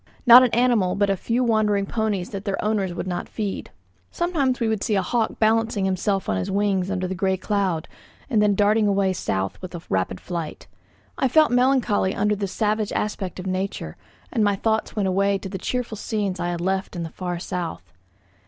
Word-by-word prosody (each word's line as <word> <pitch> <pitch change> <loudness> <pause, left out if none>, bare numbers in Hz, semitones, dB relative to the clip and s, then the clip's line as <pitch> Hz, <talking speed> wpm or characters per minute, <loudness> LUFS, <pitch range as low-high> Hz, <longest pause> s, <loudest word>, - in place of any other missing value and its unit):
Not 245 0 +10
an 255 - +4
animal 230 -6 +2
but 200 0 +2
a - - +2
few 235 +6 -1
wandering 215 -4 +2
ponies 210 -4 -2
that 195 -1 -5
their 200 -2 -2
owners 205 -4 0
would 175 - -4
not 180 -1 -4
feed. 210 -3 -4 0.4
Sometimes 300 -8 0
we 230 - +1
could 220 -2 0
see 215 - +1
a 195 - +1
hawk 235 -2 -1
balancing 220 -2 +2
himself 190 +1 0
on 95 - 0
his 90 - -2
wings 195 -2 +1
under 185 -1 -1
the 185 - -3
grey 190 0 0
cloud, 190 -5 -1 0.4
and 225 -6 +2
then 205 -1 +3
darting 210 +1 +3
away 195 -1 +2
south 95 - -3
with 185 -1 -6
rapid 95 -1 0
flight. 170 -3 -5 0.5
I 265 - +3
felt 310 +3 +4
melancholy 245 -6 +2
under 210 +1 +1
this 200 -2 -3
savage 215 -1 0
aspect 195 -3 -3
of 180 - -6
nature, 190 +1 -3 0.4
and 225 -5 +2
my 205 -1 +3
thoughts 220 +2 -1
went 205 -3 0
away 195 +1 +2
to 190 0 -7
the 190 - -5
cheerful 245 -3 -3
scenes 200 -4 -2
I 175 0 -1
had 175 -1 -3
left 190 +1 -1
in 170 - -3
the 165 - -5
far 180 -2 -4
south. 170 - -5
200 Hz, 200 wpm, -23 LUFS, 185-220 Hz, 0.5 s, Not